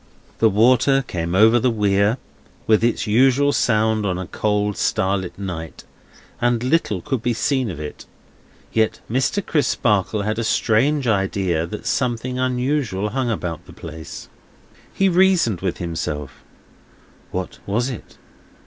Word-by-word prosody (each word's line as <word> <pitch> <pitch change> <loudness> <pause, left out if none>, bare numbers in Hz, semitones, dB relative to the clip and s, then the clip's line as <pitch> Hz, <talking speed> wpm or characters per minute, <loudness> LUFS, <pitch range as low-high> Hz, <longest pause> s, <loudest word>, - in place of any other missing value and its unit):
The 110 - +5
water 130 +6 +4
came 85 0 -3
over 110 +4 +6
the 125 - +2
Weir, 105 0 +2 0.5
with 110 0 +3
its 120 0 +1
usual 130 +6 +3
sound 110 -1 +2
on 95 -3 -1
a 95 - -4
cold 105 +1 -1
starlight 95 -1 -1
night, 85 -5 -6 0.6
and 120 -1 +1
little 125 - 0
could 130 -4 -2
be 120 0 0
seen 130 -1 0
of 85 -5 -6
it; 75 -1 -8 0.7
yet 110 -1 +1
Mr. 130 - 0
Crisparkle 105 - +1
had 110 +2 -1
a - - -1
strange 130 +6 +2
idea 95 -6 0
that 105 +5 -7
something 125 0 -1
unusual 125 -5 0
hung 130 +1 -1
about 90 -6 -4
the - - -12
place. 80 -1 -9 0.6
He 195 - +2
reasoned 180 - +3
with 95 -2 -2
himself: 75 -5 -5 0.9
What 90 0 -5
was 115 +6 0
it? 120 - -10
110 Hz, 140 wpm, -21 LUFS, 95-125 Hz, 0.9 s, over